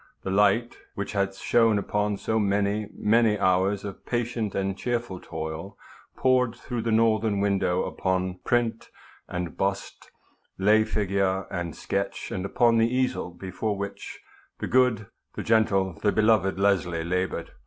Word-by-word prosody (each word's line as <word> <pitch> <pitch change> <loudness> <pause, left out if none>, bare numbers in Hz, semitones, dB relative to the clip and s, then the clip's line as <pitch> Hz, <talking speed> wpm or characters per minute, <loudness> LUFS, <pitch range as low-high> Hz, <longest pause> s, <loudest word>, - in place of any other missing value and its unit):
The 95 - -3
light 105 +4 +2 0.2
which 100 - -4
had 100 -1 -1
shone 115 +1 +3
upon 105 0 -1
so 110 +2 -1
many, 100 +1 0
many 110 0 +3
hours 95 +1 +1
of 100 -2 -8
patient 120 -3 -2
and 95 0 -1
cheerful 120 -4 -3
toil 80 +4 -6 0.4
poured 125 -2 +2
through 120 -1 -5
the 115 0 -1
northern 110 -2 +2
window 100 -3 +1
upon 95 -1 -2
print 120 -2 0 0.4
and 90 -1 -4
bust, 95 0 -3 0.5
lay 105 +3 +4
figure 100 -2 0
and 85 -4 -4
sketch, 100 0 -3
and 95 0 -3
upon 115 +1 +3
the 115 +1 +3
easel 130 -7 0
before 95 +4 -4
which 100 0 -6 0.4
the - - -4
good, 125 -4 +2 0.3
the - - -4
gentle, 100 -4 +2
the 105 - +3
beloved 110 -4 +3
Leslie 90 -4 +1
labored. 90 +2 -2
100 Hz, 145 wpm, -26 LUFS, 95-115 Hz, 0.5 s, lay